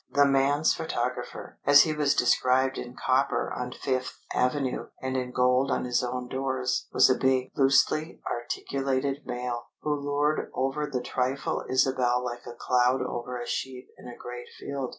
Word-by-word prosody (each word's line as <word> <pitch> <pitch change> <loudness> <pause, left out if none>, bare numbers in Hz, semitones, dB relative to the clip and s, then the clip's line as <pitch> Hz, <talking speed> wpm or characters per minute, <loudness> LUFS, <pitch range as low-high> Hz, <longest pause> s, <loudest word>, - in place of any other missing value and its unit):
The 145 0 +4
"man's 140 +2 +3
photographer," 125 -6 -4
as 145 0 +8
he 155 - -1
was 145 -2 +2
described 130 +2 +2
in 125 +1 -7
copper 130 +2 +1
on 125 0 -4
Fifth 130 -1 -3 0.2
Avenue 130 +1 0
and 130 0 -3
in 125 -1 -1
gold 125 +2 +2
on - - 0
his 125 0 +1
own 125 0 -3
doors, 130 0 -1
was - - +6
a 130 - +4
big, 130 0 +1
loosely 140 +4 +2
articulated 135 +3 -2
male, 125 -1 -4
who 150 - 0
loured 145 +1 0
over 135 +3 -1
the 125 -2 -1
trifle 130 +2 -1
Isabel 130 -1 +2
like 120 0 -6
a 120 - -8
cloud 125 +1 +2
over 125 0 -4
a 120 - -5
sheep 130 0 -4
in - - -11
a 120 - -9
great 120 0 -8
field. 135 -2 -4
130 Hz, 165 wpm, -27 LUFS, 125-140 Hz, 0.2 s, as